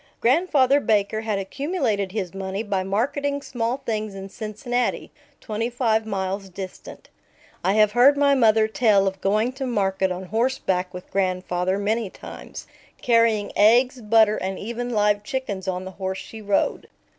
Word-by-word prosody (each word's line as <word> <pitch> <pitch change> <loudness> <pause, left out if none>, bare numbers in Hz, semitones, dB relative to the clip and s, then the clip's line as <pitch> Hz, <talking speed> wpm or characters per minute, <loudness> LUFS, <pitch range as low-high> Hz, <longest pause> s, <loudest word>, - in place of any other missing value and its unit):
Grandfather 275 0 +3
Baker 215 -3 +1
had 220 -2 -2
accumulated 215 - -2
his 195 -4 -4
money 195 +2 -4
by 200 -3 -1
marketing 275 +9 -1
small 245 +1 -3
things 215 -2 -3
in 195 0 -7
Cincinnati, 235 +4 -3 0.3
twenty 225 +2 -3
five 225 -3 0
miles 195 -1 -3
distant. 185 0 -9 0.5
I 190 - +2
have 215 -1 +4
heard 255 +5 +5
my 280 0 +4
mother 220 -4 +4
tell 215 -3 +3
of 190 -1 -3
going 215 +5 +1
to 265 0 -4
market 195 -4 0
on 180 +1 -4
horseback 195 -4 -1
with 180 0 -10
grandfather 185 -1 0
many 215 +1 -1
times, - - -10 0.3
carrying 230 -3 +2
eggs, 245 +5 +4
butter, 215 -1 +4
and 190 0 -3
even 235 +3 -4
live 210 -2 +2
chickens 210 -6 -4
on 185 0 -2
the 190 - -7
horse 190 0 -2
she 220 +2 -9
rode. 205 -1 0
215 Hz, 155 wpm, -23 LUFS, 195-240 Hz, 0.5 s, heard